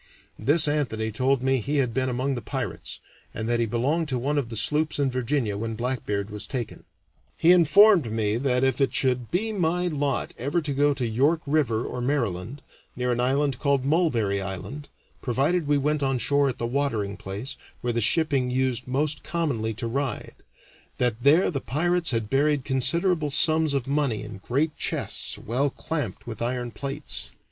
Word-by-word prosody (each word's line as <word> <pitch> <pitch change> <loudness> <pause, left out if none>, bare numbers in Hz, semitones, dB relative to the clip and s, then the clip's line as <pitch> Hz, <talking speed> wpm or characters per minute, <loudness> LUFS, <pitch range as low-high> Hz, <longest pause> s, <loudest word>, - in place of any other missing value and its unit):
This 155 +2 +5
Anthony 120 -7 -1
told 130 +3 +1
me 135 0 +2
he 140 +7 -2
had 125 -4 +1
been 130 +2 0
among 130 +3 -1
the 120 - -4
pirates, - - -5 0.4
and 110 - -3
that 120 0 +1
he 115 - +1
belonged 140 +8 0
to 130 - 0
one 145 +4 0
of 125 -5 -4
the 115 - -4
sloops 150 +7 +2
in 140 -2 +1
Virginia 125 -4 -1
when 115 0 -3
Blackbeard 110 -4 -2
was 105 0 -4
taken. 120 -5 -5 0.5
He 170 - +5
informed 180 - +6
me 110 -1 0
that 125 0 +1
if 130 0 +1
it 135 - +1
should 125 -3 0
be 220 +6 -1
my 180 -1 0
lot 145 -4 -1
ever 140 +7 0
to 150 -3 -3
go 145 +1 +2
to 130 -3 -1
York 140 +9 +2
River 140 -7 +1
or 125 - -4
Maryland, 120 -2 -2 0.3
near 125 0 -1
an 120 - -1
island 135 +1 +1
called 140 -3 +1
Mulberry 120 - +1
Island, 100 +10 -6 0.3
provided 145 +6 0
we 145 0 +3
went 150 +1 0
on 135 -2 +1
shore 140 +1 +2
at 125 - -4
the 115 - -3
watering 115 -6 -1
place, 100 +8 -6 0.3
where 120 -1 -1
the 115 - 0
shipping 140 0 +2
used 125 -1 -1
most 145 +3 -1
commonly 135 -10 -2
to 120 +2 -5
ride, 135 +2 -3 0.6
that 120 -2 0
there 155 +9 +4
the 135 -5 -3
pirates 170 - 0
had 115 -4 -1
buried 140 +3 +1
considerable 150 +5 +1
sums 155 0 +3
of 135 -2 -2
money 140 -7 0
in 105 -2 -9
great 140 +9 -1
chests - - -1
well 130 +6 -1
clamped 160 +2 -4
with 115 -2 -7
iron 120 0 -2
plates. 140 +4 -6
135 Hz, 185 wpm, -25 LUFS, 120-150 Hz, 0.6 s, informed